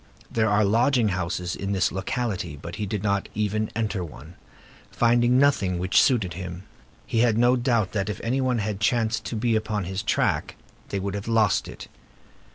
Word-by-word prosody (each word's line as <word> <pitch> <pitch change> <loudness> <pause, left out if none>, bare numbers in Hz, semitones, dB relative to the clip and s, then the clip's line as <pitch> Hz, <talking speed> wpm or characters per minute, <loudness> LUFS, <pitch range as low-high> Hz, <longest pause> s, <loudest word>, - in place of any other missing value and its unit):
There 110 -2 +1
are 105 +1 +3
lodging 115 +2 +3
houses 90 -1 -2
in 100 +1 -3
this 95 -2 +1
locality, 95 - -3
but 85 +4 -8
he 105 - -3
did 105 -1 -3
not 100 -1 0
even 105 +1 -1
enter 105 -4 -1
one, 80 0 -11 0.6
finding 120 +1 +3
nothing 130 -10 +2
which 90 +2 +3
suited 110 -10 +2
him. 90 +1 -7 0.4
He 115 - -1
had 115 -2 +3
no 120 +2 +4
doubt 120 -6 +1
that 100 -2 -2
if 105 - -4
any 130 +4 0
one 130 -2 +1
had 105 -2 -2
chanced 115 +1 +1
to - - -4
be 115 +1 +1
upon 110 -2 -1
his 95 +2 -3
track, - - 0 0.3
they 100 - -2
would 100 0 -3
have 100 +1 -5
lost 110 -3 +2
it. - - -9
105 Hz, 185 wpm, -25 LUFS, 95-115 Hz, 0.6 s, no